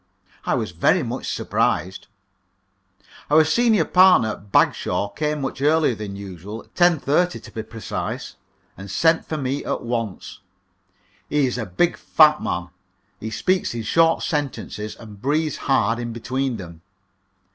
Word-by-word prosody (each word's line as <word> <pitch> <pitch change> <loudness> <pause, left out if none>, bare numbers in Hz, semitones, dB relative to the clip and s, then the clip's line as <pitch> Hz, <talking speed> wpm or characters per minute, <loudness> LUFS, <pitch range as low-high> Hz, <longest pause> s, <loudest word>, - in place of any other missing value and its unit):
I - - +2
was - - -2
very - - +2
much - - -4
surprised. 95 +1 -1 1.2
Our 155 +2 +6
senior 220 +7 +3
partner, 180 - +5
Mr. 100 0 -19
Bagshaw, 95 +2 +2
came 150 +7 -2
much 135 0 -4
earlier 150 -2 +3
than 105 -2 -6
usual, 100 +2 -8
10.30, 175 0 +2
to - - -12
be 110 - -5
precise, 110 -3 -5 0.4
and 95 +1 -10
sent 160 - +2
for 155 - -3
me 140 0 -2
at - - -3
once. 115 -5 -4 0.9
He 150 -2 +2
is 125 -1 -2
a 110 - -4
big, 165 - +1
fat 150 -1 +4
man; 85 0 -3 0.5
he 110 - -5
speaks 185 +3 0
in 115 - -3
short 165 +9 +3
sentences, 135 -8 -3
and 105 -3 -13
breathes 155 +2 0
hard 120 -4 +1
in 120 -1 -4
between 130 +2 -2
them. 85 -4 -10
125 Hz, 145 wpm, -22 LUFS, 105-155 Hz, 1.2 s, Our